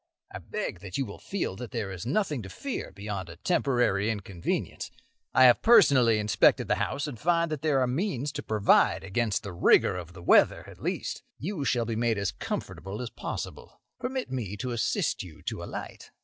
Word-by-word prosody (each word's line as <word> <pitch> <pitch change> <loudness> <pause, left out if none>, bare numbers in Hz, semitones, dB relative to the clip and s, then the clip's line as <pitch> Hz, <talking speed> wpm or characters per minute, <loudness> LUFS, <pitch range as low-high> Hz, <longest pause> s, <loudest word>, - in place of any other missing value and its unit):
I - - -6
beg - - -4
that 95 0 -6
you 135 - 0
will 100 - -9
feel 195 - -3
that 125 -2 -6
there 110 -6 -3
is 95 +4 -6
nothing 150 - 0
to 95 - -9
fear 275 - -5
beyond 100 -3 -5
a 85 - -9
temporary 120 - +1
inconvenience. 100 -5 -3 0.4
I 130 - +5
have 125 -2 +7
personally 140 - +6
inspected 105 -1 +3
the - - +1
house, 140 +2 -1
and 135 -7 -6
find 170 0 +2
that 150 -3 -3
there 150 -3 +2
are 130 - +3
means 145 - -1
to - - -5
provide 105 -3 +3
against 105 +2 -1
the 100 -3 -6
rigour 85 - +4
of 90 -1 -8
the 90 -1 -11
weather, - - +4
at - - -13
least. - - -3 0.2
You 175 -2 -3
shall 120 -2 +1
be 115 0 -2
made 115 -1 +1
as 100 -1 -1
comfortable 95 +2 -5
as 125 -2 -5
possible. - - -6 0.2
Permit 255 - -3
me 110 -6 -3
to 125 +3 -3
assist 120 -2 0
you 85 -4 -11
to - - -4
alight." - - -7
120 Hz, 195 wpm, -28 LUFS, 100-145 Hz, 0.4 s, have